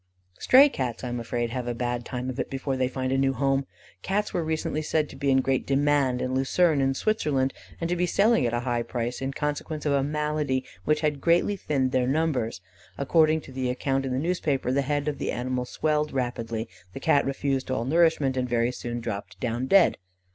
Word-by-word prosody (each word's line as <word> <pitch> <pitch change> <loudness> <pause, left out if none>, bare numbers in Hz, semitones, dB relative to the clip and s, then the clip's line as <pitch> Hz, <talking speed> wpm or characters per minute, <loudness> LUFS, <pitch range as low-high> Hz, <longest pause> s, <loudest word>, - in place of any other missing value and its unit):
'" 90 - -43
Stray 270 +3 +7
Cats, 125 - -4
I 125 - -3
am 120 0 -3
afraid, 120 0 -2
have 125 0 -3
a 120 - -2
bad 120 0 -2
time 125 0 -4
of 130 - -8
it - - -2
before 135 0 -2
they 130 -1 +1
find 130 0 -3
a 135 - +2
new 135 0 +2
home. 135 0 0 0.3
Cats 210 +2 -1
were 175 - 0
recently 155 -1 -2
said 155 0 0
to - - -11
be 140 - -1
in 135 0 +4
great 135 0 0
demand 140 -2 +2
at 130 - -2
Lucerne, 140 +4 +2
in 135 0 +1
Switzerland, 140 -10 0 0.3
and 165 - -1
to 175 - 0
be 180 0 +1
selling 210 - +3
at - - -1
a 120 - -1
high 120 -1 -1
price, 120 +1 -3
in 135 0 -2
consequence 150 +2 -3
of 145 - +2
a 140 - +3
malady 150 -2 -1 0.2
which 150 0 +2
had 150 -3 0
greatly 175 +4 +3
thinned 135 -8 -1
their 125 -1 +1
numbers. 135 - 0 0.4
According 155 +2 +3
to - - -13
the 130 -1 -2
account 135 +2 -1
in 135 - -3
the 125 - 0
newspaper, 145 -4 0
the 140 +2 +2
head 145 +1 -1
of 145 -3 -2
the - - -1
animal 125 +1 -2
swelled 150 +3 0
rapidly; 115 -3 -3 0.3
the - - -6
Cat 140 0 +3
refused 135 -1 -2
all 130 -3 -1
nourishment, 155 -2 +3
and 125 -1 -1
very 120 0 +1
soon 120 -1 -5
dropped 100 -5 -6
down 120 +1 -2
dead. 195 +4 +5
135 Hz, 220 wpm, -26 LUFS, 125-150 Hz, 0.4 s, Stray